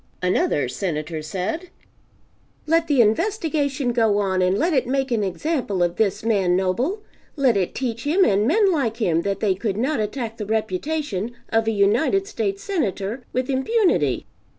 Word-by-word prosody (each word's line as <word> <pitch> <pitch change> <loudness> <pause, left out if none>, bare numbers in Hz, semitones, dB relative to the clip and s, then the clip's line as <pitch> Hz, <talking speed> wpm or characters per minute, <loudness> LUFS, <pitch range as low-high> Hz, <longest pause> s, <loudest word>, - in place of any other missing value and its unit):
Another 180 -6 +1
Senator 155 +2 -3
said, 195 - -4 1.0
"Let 330 +1 +2
the 280 -5 +4
investigation 285 - 0
go 225 -4 +2
on 190 -2 +1
and 185 +2 +2
let 335 +6 +1
it 260 -4 +1
make 270 0 -1
an 225 -3 +1
example 200 - -1
of 175 0 -1
this 205 -1 0
man 195 -6 +2
Noble; 245 - 0 0.3
let 265 -6 +3
it 190 -3 -1
teach 235 -3 -3
him 370 +6 +4
and 205 +1 +2
men 400 - +4
like 250 -9 0
him 170 -8 +1
that 200 +2 -2
they 205 -3 +3
could 200 +1 -3
not 260 +3 0
attack 225 +1 -3
the 210 - -4
reputation 220 +1 -2 0.2
of 225 0 +1
a - - +3
United 225 - +2
States 210 - -3
Senator 235 - -2
with 255 0 -1
impunity." 265 - +1
225 Hz, 165 wpm, -22 LUFS, 195-290 Hz, 1.0 s, the